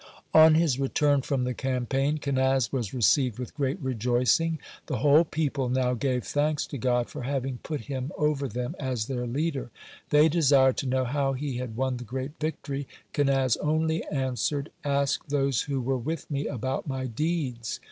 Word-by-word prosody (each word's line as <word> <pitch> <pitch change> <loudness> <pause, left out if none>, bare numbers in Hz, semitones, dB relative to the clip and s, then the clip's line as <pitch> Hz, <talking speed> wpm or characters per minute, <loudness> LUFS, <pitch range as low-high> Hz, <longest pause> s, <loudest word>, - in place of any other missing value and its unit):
On 160 0 +8
his 155 -5 +2
return 140 +1 +2
from 135 -2 -1
the 125 0 -1
campaign, 135 +3 0
Kenaz 135 -4 +1
was 120 -7 -2
received 125 -1 +2
with 125 -2 -6
great 140 +3 -1
rejoicing. 125 +5 +1 0.3
The - - -1
whole 150 +2 +5
people 145 -5 -1
now 125 0 +1
gave 125 0 -1
thanks 150 +1 0
to 140 - -3
God 125 0 +1
for - - -7
having 130 -1 -2
put 150 -5 -4
him 130 +2 -4
over 150 -2 +1
them 125 - -4
as 130 -5 -2
their 125 -1 -3
leader. 140 +1 -2 0.4
They 150 +1 +6
desired 140 -5 +4
to 135 - -2
know 130 0 +1
how 135 +1 0
he 135 -1 -3
had 125 -3 -5
won 130 -1 0
the 120 - -7
great 130 +4 -4
victory. 140 -3 -3 0.3
Kenaz 135 -4 +2
only 160 +2 0
answered: 140 +2 -1
"Ask 140 0 0
those 140 -3 +1
who 140 -2 -2
were 130 +1 -1
with 155 +5 -4
me 140 0 -1
about 130 +2 -3
my 130 -2 -2
deeds." 130 - -2
135 Hz, 175 wpm, -27 LUFS, 125-145 Hz, 0.4 s, On